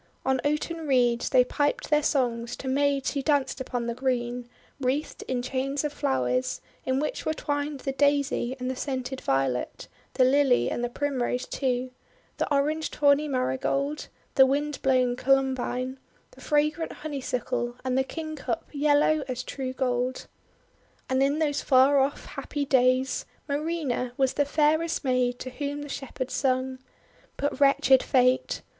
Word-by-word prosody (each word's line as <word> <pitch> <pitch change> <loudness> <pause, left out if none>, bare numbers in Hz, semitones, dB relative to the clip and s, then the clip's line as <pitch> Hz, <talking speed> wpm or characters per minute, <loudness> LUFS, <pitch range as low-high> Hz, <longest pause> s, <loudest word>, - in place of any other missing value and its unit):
On 265 -1 +1
oaten 310 +2 -1
reeds 245 -3 +2
they 250 - +5
piped 290 +4 -1
their 300 0 +5
songs 240 -5 0
to 265 - -8
maids 280 0 +1
w7ho 280 -1 -2
danced 280 -3 +1
upon 245 -2 -3
the 235 - -2
green, 245 -1 -2 0.3
wreathed 275 +3 -2
in 250 -1 -1
chains 270 +2 -2
of 300 -1 -2
flowers, 125 - 0 0.3
in 260 +1 +1
which 300 - -2
were 315 - -1
twined 290 -1 -3
the 270 - -2
Daisy 280 -2 +1
and 250 - -3
the 260 - -2
scented 260 -1 -4
Violet, 135 -2 -1 0.3
the 260 - +4
Lily 265 0 +3
and 240 - -2
the 240 - 0
Primrose, 255 -2 -1
too, 255 -1 -2 0.5
the - - -2
orange 300 +3 +1
tawny 285 +1 +3
Marigold, 275 +2 -1 0.3
the 265 -2 +6
wind 290 +2 -1
blown 255 -2 +2
Columbine, 260 -1 0 0.3
the - - -17
fragrant 305 +2 +1
Honeysuckle, 250 -4 -3
and 255 -1 0
the 265 - +3
Kingcup 310 +2 -5
yellow 295 +1 +3
as 255 -1 -3
true 265 -2 -4
gold. 255 -1 -1
PAN'S - - -8
SONG 260 0 -8
101 270 - +4
And 285 - 0
in 310 0 +1
those 290 -1 -2
far 270 +1 +5
off 275 +2 0
happy 290 -1 -4
days, 260 0 +2 0.2
Marina 285 -5 -2
was 265 -1 +2
the 290 - +1
fairest 315 +3 +1
maid 250 -2 +1
to 255 - -7
whom 285 +2 -4
the 290 - -8
Shepherds 260 -1 -5
sung. 260 -1 0 0.6
But 285 -1 -2
wretched 275 -2 +5
fate! 255 0 +2
265 Hz, 160 wpm, -27 LUFS, 255-290 Hz, 0.6 s, the